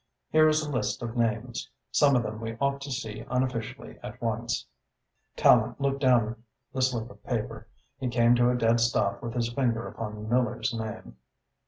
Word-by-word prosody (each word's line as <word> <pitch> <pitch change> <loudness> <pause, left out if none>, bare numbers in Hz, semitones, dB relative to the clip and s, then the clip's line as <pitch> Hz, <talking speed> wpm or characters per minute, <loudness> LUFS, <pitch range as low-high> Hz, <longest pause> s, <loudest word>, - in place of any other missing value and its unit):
Here 155 0 +6
is 155 0 +2
a 150 - -4
list 120 -2 -1
of 115 0 -4
names. 115 -2 -1 0.2
Some 140 -2 +5
of 120 - +3
them 110 0 -5
we 115 0 -5
ought 140 +1 0
to 140 0 -6
see 110 -5 -4
unofficially 125 -3 -2
at - - -8
once." - - -2 0.7
Tallente - - +5
looked 140 0 0
down 115 -3 +3 0.3
the 130 - -1
slip 120 -3 0
of 100 0 -17
paper. 115 -2 -3 0.3
He 130 - -2
came 120 0 +4
to 120 0 +4
a 125 - +2
dead 115 0 +3
stop 115 -4 +1
with 115 0 -5
his 120 -1 -1
finger 120 -3 0
upon 105 -1 -6
Miller's 120 +1 +1
name. 110 - -6
120 Hz, 180 wpm, -28 LUFS, 110-130 Hz, 0.7 s, Here